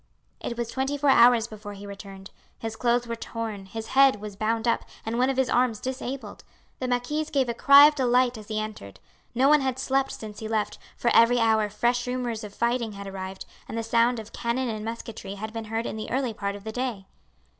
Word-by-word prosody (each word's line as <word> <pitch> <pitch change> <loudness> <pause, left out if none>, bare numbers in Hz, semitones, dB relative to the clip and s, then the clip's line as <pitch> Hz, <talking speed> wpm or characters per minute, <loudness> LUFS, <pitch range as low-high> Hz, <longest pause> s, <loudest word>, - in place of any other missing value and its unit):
It 235 - -5
was 235 -1 -3
twenty 270 +2 -1
four 285 -1 +3
hours 235 -2 +6
before 215 -2 -9
he 200 0 -10
returned. 195 -1 -10 0.3
His 225 -1 -5
clothes 240 +1 +1
were 235 0 -4
torn, 225 -4 -6
his 225 +2 -7
head 270 -4 +5
was 210 -1 -7
bound 225 +3 -1
up, 230 - +2 0.2
and 230 +2 -2
one 255 +1 +3
of 270 - -1
his 265 -1 +2
arms 245 -3 +2
disabled. 260 +1 -5 0.4
The 255 - -2
marquise 250 +5 -1
gave 270 -4 +1
a 235 - -1
cry 280 +4 +8
of 300 - +5
delight 250 -2 +2
as 215 -2 -10
he 215 -1 -2
entered. 215 - -7 0.4
No 260 +3 +4
one 300 0 +6
had 260 -1 -1
slept 270 +1 0
since 210 -1 -8
he 220 - -5
left, 215 -1 -1 0.2
for 235 - +1
every 230 +2 +6
hour 220 -2 +3
fresh 240 +4 0
rumours 245 -3 -2
of 210 - -7
fighting 235 0 -1
had 200 0 -8
arrived, 190 -1 -6 0.2
and 225 - -4
the 230 - -1
sound 235 +2 +2
of 220 0 -9
cannon 240 +2 -1
and 215 -1 -4
musketry 225 -3 -6
had 220 +2 -6
been 225 -1 -5
heard 225 +2 -3
in - - -4
the 215 - -5
early 255 -2 -1
part 200 -1 -3
of 200 - -10
the 220 - -5
day. 240 -5 -3
230 Hz, 225 wpm, -26 LUFS, 215-250 Hz, 0.4 s, cry